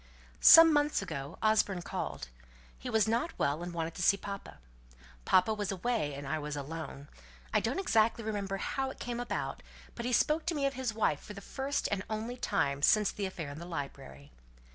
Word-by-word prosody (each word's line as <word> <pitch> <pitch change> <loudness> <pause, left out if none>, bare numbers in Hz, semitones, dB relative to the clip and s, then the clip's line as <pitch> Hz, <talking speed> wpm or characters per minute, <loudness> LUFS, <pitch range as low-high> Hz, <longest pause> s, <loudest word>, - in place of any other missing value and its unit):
"Some 325 -1 +9
months 295 -6 +2
ago 140 -6 -6
Osborne 210 -4 +2
called. - - -5 0.5
He - - -6
was 220 -2 +3
not 235 +9 -1
well, 145 +3 0
and 175 0 -5
wanted 165 -1 -3
to - - -6
see 200 +3 +4
papa. 200 0 -7 0.7
Papa 185 +4 +4
was 205 -2 -2
away, 195 - -1
and 140 0 -7
I 155 +2 -1
was 150 0 -4
alone. 145 -1 -6 0.5
I - - +4
don't 235 +4 -2
exactly 230 - +2
remember 200 -2 -3
how 265 +6 -2
it - - -10
came 240 0 -4
about, 245 - -3 0.3
but 235 - -6
he - - -1
spoke 305 +6 +2
to 340 - 0
me 285 -2 0
of 275 - 0
his 260 -3 -2
wife 210 -9 0
for 210 - -10
the - - -7
first 270 +7 -2
and 200 -2 0
only 220 +3 -3
time 140 - -1
since 210 +6 +4
the 200 -2 -3
affair 165 -6 -6
in 145 - -8
the 170 - -7
library." 70 - -7
200 Hz, 200 wpm, -31 LUFS, 155-240 Hz, 0.7 s, Some